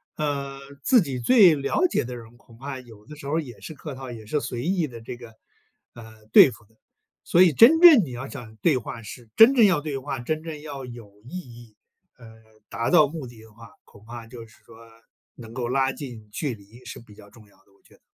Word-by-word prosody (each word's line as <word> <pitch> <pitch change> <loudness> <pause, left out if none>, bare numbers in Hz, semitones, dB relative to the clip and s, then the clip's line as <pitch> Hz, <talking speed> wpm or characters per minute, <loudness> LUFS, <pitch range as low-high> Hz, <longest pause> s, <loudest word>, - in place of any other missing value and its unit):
呃， 140 -2 -3 0.2
自 245 - +4
己 135 -4 -5
最 190 - +6
了 145 - 0
解 - - -1
的 125 0 -7
人， 115 0 -14
恐 115 -1 -20
怕 135 +1 -7
有 115 -4 -16
的 150 +2 -12
时 140 - -10
候 155 +3 0
也 125 -8 -9
是 160 - -9
客 150 +1 -8
套， 130 -1 -9
也 110 -2 -10
是 145 +7 -2
随 120 -1 -5
意 175 -2 0
的 115 -3 -11
这 120 +1 -8
个， 120 -2 -14 0.6
呃， 110 -2 -14
对 - - +9
付 120 -4 -14
的。 110 - -31 0.5
所 175 - +3
以 175 -5 +5
真 265 - +6
正 320 - +8
你 135 - -7
要 125 +2 -7
想 115 -6 -11
对 150 +2 +2
话， 115 -1 -7
是 115 +1 -11
真 235 +5 +8
正 240 - +5
要 185 -6 +3
对 145 -2 -5
话， 135 0 -5
真 155 +6 -4
正 160 -2 -7
要 145 -3 -8
有 110 -4 -13
意 125 - -15
义， 120 -7 -15 0.4
呃， 120 - -15 0.4
达 115 +3 -3
到 155 -5 +5
目 155 -1 -7
的 120 -2 -15
的 110 -1 -18
话， 115 +4 -15
恐 100 - -19
怕 115 0 -10
就 115 -1 -11
是 110 - -22
说 - - -16 0.6
能 115 -2 -12
够 120 -1 -4
拉 135 +1 +1
近 120 -7 -10
距 140 +1 -3
离 110 +4 -16
是 125 - -9
比 110 -3 -17
较 100 - -16
重 105 0 -19
要 100 - -26
的， 100 - -32
我 - - -31
觉 - - -23
得。 - - -27
125 Hz, 255 characters per minute, -24 LUFS, 115-150 Hz, 0.6 s, 对